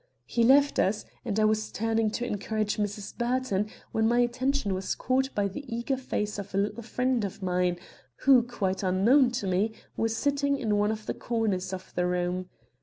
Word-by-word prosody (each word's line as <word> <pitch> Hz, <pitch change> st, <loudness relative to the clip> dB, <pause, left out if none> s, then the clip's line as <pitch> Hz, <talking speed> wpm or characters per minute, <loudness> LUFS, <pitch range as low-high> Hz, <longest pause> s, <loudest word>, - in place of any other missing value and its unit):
"He 235 Hz, -, +1 dB
left 280 Hz, +4 st, +5 dB
us, 210 Hz, +3 st, +1 dB, 0.2 s
and 220 Hz, -4 st, -1 dB
I 215 Hz, -, +4 dB
was 215 Hz, 0 st, +1 dB
turning 225 Hz, 0 st, +1 dB
to 245 Hz, -, -3 dB
encourage 215 Hz, -1 st, -2 dB
Mrs. 205 Hz, -1 st, -3 dB
Burton 240 Hz, -4 st, 0 dB, 0.2 s
when 220 Hz, 0 st, +2 dB
my 240 Hz, +1 st, +2 dB
attention 250 Hz, -2 st, 0 dB
was 190 Hz, 0 st, -2 dB
caught 265 Hz, +1 st, +1 dB
by 205 Hz, -1 st, +2 dB
the 200 Hz, +9 st, -7 dB
eager 235 Hz, +4 st, -1 dB
face 210 Hz, -5 st, -3 dB
of 200 Hz, -1 st, -7 dB
a -, -, +1 dB
little 205 Hz, +4 st, -1 dB
friend 250 Hz, +1 st, 0 dB
of 195 Hz, -1 st, -5 dB
mine, 180 Hz, -1 st, +1 dB, 0.5 s
who, 265 Hz, -2 st, +8 dB
quite 205 Hz, -6 st, -2 dB
unknown 215 Hz, +8 st, +4 dB
to 235 Hz, -, -2 dB
me, 195 Hz, +4 st, +1 dB, 0.2 s
was 225 Hz, 0 st, 0 dB
sitting 280 Hz, 0 st, +1 dB
in 215 Hz, -5 st, 0 dB
one 205 Hz, +1 st, +2 dB
of 215 Hz, -1 st, -5 dB
the -, -, -2 dB
corners 205 Hz, -6 st, -1 dB
of 185 Hz, 0 st, -7 dB
the 180 Hz, 0 st, +1 dB
room. 180 Hz, +1 st, -1 dB
215 Hz, 190 wpm, -28 LUFS, 195-245 Hz, 0.5 s, who